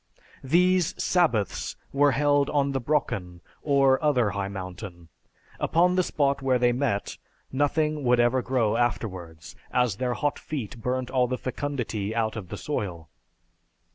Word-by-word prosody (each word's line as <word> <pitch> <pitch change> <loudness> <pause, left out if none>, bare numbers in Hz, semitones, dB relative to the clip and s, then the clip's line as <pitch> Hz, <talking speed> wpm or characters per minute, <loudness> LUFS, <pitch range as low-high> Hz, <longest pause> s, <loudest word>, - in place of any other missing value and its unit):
"These 180 +5 +3
'sabbaths' 140 - +1 0.2
were 140 0 +4
held 145 0 +2
on 140 -1 +1
the 135 -1 -2
Brocken 100 - -1 0.2
or 135 -1 +3
other 125 -8 +2
high 100 -1 -2
mountain. 90 -3 -8 0.5
Upon 175 +3 +3
the 185 - +4
spot 140 -5 0
where 130 -1 +2
they 120 0 +3
met, 120 -5 -2 0.3
nothing 150 +2 0
would 125 -1 +3
ever 120 +2 +3
grow 115 -3 +1
afterwards, 90 -9 -3 0.2
as 125 -5 +1
their 125 0 -1
hot 145 -1 -1
feet 130 -5 -6
burnt 125 +1 -2
all 125 -2 +2
the 125 +1 -2
fecundity 120 -6 -3
out 110 -1 0
of 100 -5 -7
the 105 - -5
soil. 90 - -4
125 Hz, 145 wpm, -26 LUFS, 105-145 Hz, 0.5 s, were